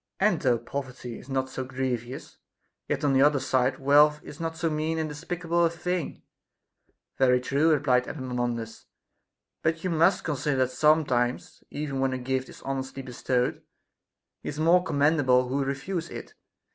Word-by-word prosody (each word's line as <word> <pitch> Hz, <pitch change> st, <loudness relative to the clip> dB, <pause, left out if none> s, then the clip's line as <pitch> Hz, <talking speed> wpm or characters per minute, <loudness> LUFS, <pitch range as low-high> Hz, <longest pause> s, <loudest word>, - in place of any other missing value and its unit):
And 195 Hz, -4 st, +2 dB
though 125 Hz, -3 st, +3 dB
poverty 125 Hz, 0 st, -6 dB
is 130 Hz, -, -15 dB
not 130 Hz, -1 st, 0 dB
so 130 Hz, -, -5 dB
grievous, 130 Hz, -1 st, -4 dB, 0.5 s
yet 145 Hz, +1 st, -2 dB
on 140 Hz, -2 st, +3 dB
the 135 Hz, -, +4 dB
other 145 Hz, 0 st, +4 dB
side, 130 Hz, 0 st, +1 dB
wealth 150 Hz, +2 st, +5 dB
is 145 Hz, -, -11 dB
not 165 Hz, 0 st, -3 dB
so 165 Hz, 0 st, 0 dB
mean 155 Hz, +1 st, -1 dB
and 160 Hz, -1 st, -1 dB
despicable 170 Hz, +3 st, -1 dB
a 165 Hz, -, +4 dB
thing. 175 Hz, 0 st, -4 dB, 1.0 s
Very 125 Hz, -1 st, +4 dB
true, 140 Hz, +5 st, +2 dB
replied 130 Hz, -4 st, +2 dB
Epaminondas; 120 Hz, -5 st, -4 dB, 0.7 s
but 160 Hz, 0 st, 0 dB
you 185 Hz, -, -1 dB
must 170 Hz, +4 st, +3 dB
consider 145 Hz, -2 st, -1 dB
that 130 Hz, -1 st, +1 dB
sometimes, 130 Hz, -5 st, +1 dB
even 145 Hz, -2 st, -4 dB
when 135 Hz, 0 st, +1 dB
a -, -, -1 dB
gift 130 Hz, +1 st, -2 dB
is -, -, -13 dB
honestly 135 Hz, 0 st, -4 dB
bestowed, 125 Hz, 0 st, -1 dB, 0.8 s
he -, -, -5 dB
is 150 Hz, -, -6 dB
more 170 Hz, +3 st, +4 dB
commendable 145 Hz, -5 st, +3 dB
who 140 Hz, +2 st, 0 dB
refuses 160 Hz, +6 st, -3 dB
it. -, -, -8 dB
140 Hz, 160 wpm, -27 LUFS, 130-160 Hz, 1.0 s, wealth